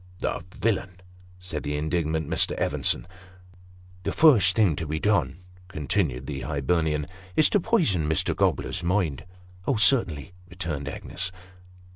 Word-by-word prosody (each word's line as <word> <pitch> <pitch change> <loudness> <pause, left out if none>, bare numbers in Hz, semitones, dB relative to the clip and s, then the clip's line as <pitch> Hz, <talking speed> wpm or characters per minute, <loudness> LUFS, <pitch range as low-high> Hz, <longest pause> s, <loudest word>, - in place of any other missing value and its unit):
" - - -24
The - - -2 0.2
villain! 95 -5 -1 0.2
" - - -24
said 90 -5 -6
the 75 0 -3
indignant 80 0 -1
Mr. - - +2
Evenson. - - +1 0.5
" 90 0 -24
The - - -1
first 110 - +5
thing 100 -8 +3
to 80 - -4
be 80 +1 -2
done," 105 +1 +1 0.3
continued 75 -5 -2
the 70 -2 -5
Hibernian, 75 +1 0 0.2
" 95 0 -21
is 155 - +4
to 205 - +4
poison 155 - +1
Mr. 80 - +2
Gobler's - - 0
mind." 85 -5 -1 0.2
" 90 0 -23
Oh, 135 - +2
certainly," 95 - +2 0.2
returned 80 -6 -4
Agnes. 95 +5 -5
90 Hz, 155 wpm, -26 LUFS, 75-95 Hz, 0.5 s, first